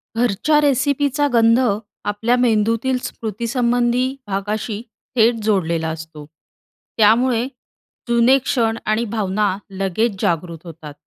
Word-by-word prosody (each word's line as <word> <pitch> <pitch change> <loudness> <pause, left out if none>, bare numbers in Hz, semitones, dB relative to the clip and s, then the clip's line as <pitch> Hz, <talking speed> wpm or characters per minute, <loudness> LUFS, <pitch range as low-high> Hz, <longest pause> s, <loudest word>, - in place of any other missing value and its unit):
घरच्या 245 +6 +2
रेसिपीचा 285 +1 +1
गंध, 230 0 +5 0.5
आपल्या 225 +4 +1
मेंदूतील 230 +2 +1
स्मृतीसंबंधी 240 +3 -1
भागाशी 205 +2 -3 0.3
थेट 230 0 +4
जोडलेला 170 -6 0
असतो. 160 -1 -8 0.7
त्यामुळे, 230 +3 +3 0.6
जुने 235 +3 +4
क्षण 230 -4 0
आणि 215 +2 0
भावना 205 -1 0 0.2
लगेच 195 +2 -1
जागृत 170 0 -2
होतात. 160 -3 -10
225 Hz, 100 wpm, -20 LUFS, 195-245 Hz, 0.7 s, गंध